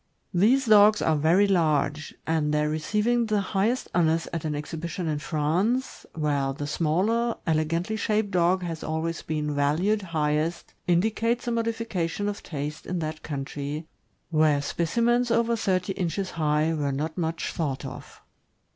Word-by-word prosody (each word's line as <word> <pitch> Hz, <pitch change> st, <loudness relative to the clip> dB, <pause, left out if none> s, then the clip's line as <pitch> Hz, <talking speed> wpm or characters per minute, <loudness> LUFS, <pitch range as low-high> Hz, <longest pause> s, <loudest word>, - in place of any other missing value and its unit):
These 235 Hz, +9 st, +4 dB
dogs 210 Hz, -1 st, +6 dB
are 160 Hz, -, +3 dB
very 165 Hz, +7 st, +4 dB
large; 155 Hz, -5 st, +1 dB
and 160 Hz, -2 st, +1 dB
their 150 Hz, 0 st, +2 dB
receiving 210 Hz, +10 st, +1 dB
the 215 Hz, -1 st, +1 dB
highest 200 Hz, +5 st, 0 dB
honors 165 Hz, -1 st, +2 dB
at 165 Hz, -1 st, -3 dB
an 150 Hz, -1 st, -1 dB
exhibition 165 Hz, +4 st, -4 dB
in 150 Hz, -2 st, -1 dB
France, 175 Hz, -, -1 dB
where 145 Hz, -3 st, 0 dB
the 145 Hz, +2 st, -5 dB
smaller, 190 Hz, +11 st, +1 dB
elegantly 165 Hz, +6 st, 0 dB
shaped 210 Hz, -1 st, 0 dB
dog 180 Hz, 0 st, +2 dB
has 165 Hz, -2 st, -4 dB
always 160 Hz, +1 st, -2 dB
been 150 Hz, -1 st, -2 dB
valued 160 Hz, +9 st, +1 dB
highest, 155 Hz, -1 st, -1 dB
indicates 220 Hz, +7 st, +1 dB
a -, -, +1 dB
modification 225 Hz, -5 st, -1 dB
of 205 Hz, 0 st, -3 dB
taste 150 Hz, -1 st, -5 dB
in 180 Hz, -, -2 dB
that 155 Hz, -1 st, -4 dB
country, 145 Hz, +1 st, -5 dB, 0.5 s
where 155 Hz, -2 st, +3 dB
specimens 235 Hz, +11 st, +1 dB
over 235 Hz, 0 st, +2 dB
thirty 190 Hz, -3 st, 0 dB
inches 185 Hz, +1 st, -2 dB
high 155 Hz, 0 st, +1 dB
were 145 Hz, -3 st, -1 dB
not 155 Hz, +4 st, -3 dB
much 165 Hz, -2 st, -2 dB
thought 140 Hz, -5 st, -2 dB
of. -, -, -9 dB
165 Hz, 145 wpm, -26 LUFS, 155-205 Hz, 0.5 s, dogs